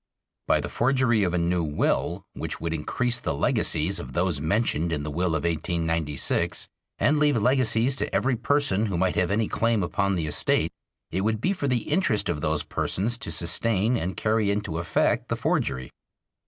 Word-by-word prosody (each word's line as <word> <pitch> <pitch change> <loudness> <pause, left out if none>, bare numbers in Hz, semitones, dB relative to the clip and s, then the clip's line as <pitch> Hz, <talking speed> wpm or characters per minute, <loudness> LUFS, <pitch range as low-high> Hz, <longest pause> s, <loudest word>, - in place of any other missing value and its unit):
By 75 - +3
the 75 - -4
forgery 120 - +2
of 90 - +1
a - - +2
new 85 +1 +1
will 75 -1 -1
which - - -5
would 80 0 -3
increase 120 +10 0
the 75 - -2
legacies 80 +5 +1
of 65 -2 -8
those 85 -3 0
mentioned 85 -1 0
in 75 -3 -2
the 75 - -4
will 85 +2 0
of 75 - -2
1896 80 -3 0 0.3
and 150 +1 +2
leave 145 -4 +3
legacies 125 +1 +2
to - - -1
every 130 -1 +1
person 120 -4 +1
who 95 -4 -2
might 95 +1 +1
have 90 - +1
any 105 +2 +1
claim 115 -3 +1
upon 100 +3 0
the 85 -3 -1
estate, 75 -1 +1 0.4
it 95 - -1
would 110 +1 0
be 185 - +1
for 160 -7 -3
the 125 -4 +1
interest 150 - 0
of 75 - -2
those 75 -1 0
persons 110 +5 -1
to - - -5
sustain 100 +7 +1
and 95 -4 -3
carry 110 -1 +1
into 100 -5 -2
effect 85 -1 0
the - - 0
forgery. 65 -2 -1
95 Hz, 185 wpm, -25 LUFS, 80-115 Hz, 0.4 s, By